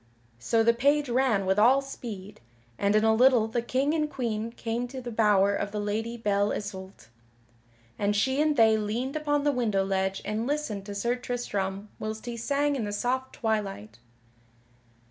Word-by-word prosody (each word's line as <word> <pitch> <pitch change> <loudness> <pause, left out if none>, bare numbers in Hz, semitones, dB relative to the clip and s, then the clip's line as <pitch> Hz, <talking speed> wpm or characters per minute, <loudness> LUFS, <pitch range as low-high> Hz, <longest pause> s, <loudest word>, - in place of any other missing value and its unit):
So 225 - +2
the 235 +1 +4
page 285 +3 +2
ran 240 -5 +2
with 190 +2 +2
all 250 +6 +6
speed, 215 -7 -8 0.4
and 200 +1 +2
in 215 - +4
a 220 0 +4
little 245 -1 +5
the 235 +2 -1
King 265 +5 0
and 305 -2 0
Queen 230 -4 -3
came 235 +1 -3
to 260 +1 -7
the 245 -1 -6
bower 205 -3 +3
of 200 0 -2
the 210 - -3
Lady 220 +3 -2
Belle 205 -2 +1
Isoult; 190 - -7 0.9
and 205 0 +1
she 265 +7 +1
and 305 -1 +2
they 220 -1 +5
leaned 230 +6 -2
upon 290 -1 0
the 290 - +3
window 215 -7 0
ledge 190 0 -1
and 220 +3 -2
listened 255 -9 -3
to 205 - -6
Sir 235 +4 0
Tristram 205 -5 -3
whilst 215 +1 -5
he 240 -1 -4
sang 285 +5 0
in 240 -5 -2
the 205 - -4
soft 255 +5 -2
twilight. 195 - -3
225 Hz, 180 wpm, -27 LUFS, 205-255 Hz, 0.9 s, all